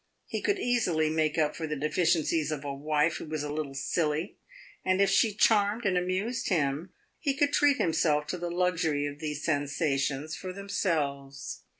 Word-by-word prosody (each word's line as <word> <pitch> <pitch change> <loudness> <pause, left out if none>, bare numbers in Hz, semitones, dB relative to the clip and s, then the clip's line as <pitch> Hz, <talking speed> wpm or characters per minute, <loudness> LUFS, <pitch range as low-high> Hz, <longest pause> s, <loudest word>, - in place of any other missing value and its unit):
He - - -4
could 405 - +1
easily 180 - +1
make 155 -1 +1
up 150 -2 +1
for 160 - -4
the 150 - -2
deficiencies 160 0 +1
of 145 -2 -4
a 140 - -3
wife 150 +3 +1
who - - -7
was 155 -1 -3
a 150 0 -4
little 150 -3 -4
silly, 155 +4 -1 0.4
and 185 0 +2
if 200 -1 +4
she 225 - +4
charmed 210 +1 +3
and 190 -2 +2
amused 185 +7 -1
him, 155 0 0 0.3
he 280 -2 0
could 290 -1 +2
treat 290 -1 +4
himself 160 - +2
to 180 - -3
the 175 0 -3
luxury 170 -4 +1
of 145 0 -5
these 150 -2 -4
sensations 145 0 0
for 185 -1 -6
themselves. 145 -8 -2
160 Hz, 180 wpm, -29 LUFS, 150-185 Hz, 0.4 s, if